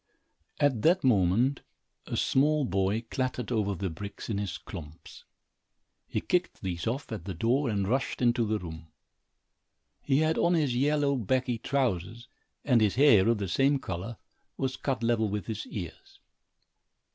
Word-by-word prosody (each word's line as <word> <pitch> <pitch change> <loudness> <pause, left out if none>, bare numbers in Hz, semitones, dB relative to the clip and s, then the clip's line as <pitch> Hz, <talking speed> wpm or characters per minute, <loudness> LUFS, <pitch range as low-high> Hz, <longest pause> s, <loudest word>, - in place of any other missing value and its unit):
At 145 -7 +2
that 175 - +3
moment, 120 +3 +3 0.5
a - - -3
small 150 +2 +2
boy 100 +1 0
clattered 125 -2 -2
over 105 -4 0
the 95 0 -3
bricks 100 +6 -7
in 100 - -1
his 95 -3 -3
klomps. 80 -4 -11 0.8
He - - -2
kicked 180 -9 -1
these 85 -1 -3
off, 125 +4 -3
at 105 -7 -5
the 95 -3 -5
door, 120 - +1
and 100 -3 0
rushed 130 +5 -1
into 120 -1 +2
the 110 0 +1
room. 80 -3 -8 1.1
He 135 -1 +1
had 160 +1 +2
on 175 0 +3
his 145 -7 +1
yellow 140 +1 +2
baggy 125 +1 0
trousers 120 -4 -1 0.4
and 125 -5 +4
his 105 -3 +2
hair, 125 -8 +6
of 115 - +3
the 100 -1 -3
same 135 +9 +3
color, 95 0 -5 0.4
was 130 -1 -1
cut 130 -4 -2
level 115 -2 +2
with 105 -1 -3
his 110 -2 -5
ears. 85 -6 -8
115 Hz, 155 wpm, -29 LUFS, 100-135 Hz, 1.1 s, hair